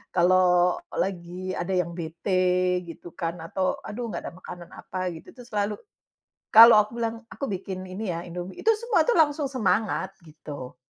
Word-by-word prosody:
kalau 180 0 +4 0.2
lagi 185 0 -3
ada 175 +2 -3
yang 170 -1 -6
bete 180 +2 0
gitu 165 +1 -10
kan 165 0 -3
atau 185 +2 -1
aduh 245 +4 -5
nggak - - -4
ada - - -8
makanan 175 -2 -10
apa 185 - -8 0.2
gitu, 160 - -12
itu - - -27
tuh - - -17
selalu 210 0 -1 0.8
kalau 225 0 +10
aku 210 0 +3
bilang, 230 0 -1 0.2
aku 275 - -4
bikin 190 -1 -5
ini 190 0 -4
ya 165 - -4
indomie, 180 +2 -7
itu - - +2
semua 440 -6 +2
tuh 350 +8 +2
langsung 295 -3 +2
semangat, 205 -5 0
gitu. 150 -5 -10
185 Hz, 170 wpm, -26 LUFS, 175-215 Hz, 0.8 s, kalau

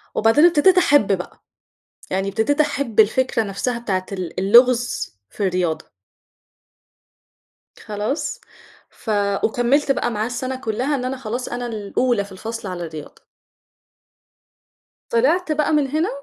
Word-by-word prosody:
وبعدين 225 +9 +4
أبتدِيت 350 +3 +5
أحب 245 - +4
بقى، 180 - -10 0.7
يعني 195 +1 -1
أبتديت 285 +9 +1
أحب 280 -7 -2
الفكرة 230 +2 +3
نفْسها 220 +4 -3
بتاعة 190 -5 -2
ال 180 -2 -5
اللغز 240 - +3
في 200 - -2
الرياضة. 180 -3 -2 1.9
خلاص؟ 215 - -3 0.5
ف - - -11 0.3
وكمّلت 255 +5 +2
بقى 240 - 0
معاه 215 -1 -1
السنة 255 +2 -4
كلّها 255 +4 -2
إن 250 - -3
أنا 260 +1 -3
خلاص، 245 0 -4
أنا 245 0 -4
الأولى 220 0 -1
في 200 - -16
الفصل 225 +2 -6
على 175 -2 -5
الرياضة. 155 -2 -10 1.9
طلعْت 310 +9 +2
بقى 305 0 +1
من 295 -2 +2
هنا، 310 +6 0
235 Hz, 125 wpm, -21 LUFS, 200-275 Hz, 1.9 s, أبتدِيت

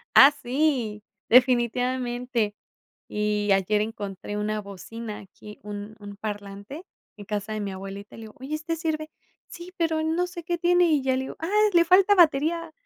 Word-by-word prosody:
Ah, 275 +2 +10
sí, 250 -5 0 0.3
definitivamente. 245 -2 +2 0.5
Y 210 -1 -1
ayer 195 +2 +2
encontré 205 -2 -5
una 210 +1 -1
bocina 210 +2 -8
aquí, 210 +2 -13
un 205 +1 -7
un 205 -1 -10
parlante 205 - -7 0.3
en 205 - -10
casa 205 +1 -4
de 215 - -3
mi 200 -1 -3
abuelita. 195 +2 -8
Le 225 - -10
digo: 215 -1 -11
"Oye, 270 +4 -5
¿este 315 +2 -3
sirve? 315 -1 -3 0.4
'Sí, 360 +1 -10
pero, 325 -2 0
no 330 +3 +1
sé 350 -2 -8
qué 345 +1 -2
tiene'", 355 0 +4
y 290 -3 +2
ya 260 -1 +1
le 260 - -1
digo: - - -8
"Ah, 325 +3 -3 0.2
le 340 -1 +5
falta 375 +4 +5
batería. 330 -1 +3
240 Hz, 170 wpm, -25 LUFS, 210-315 Hz, 0.5 s, Ah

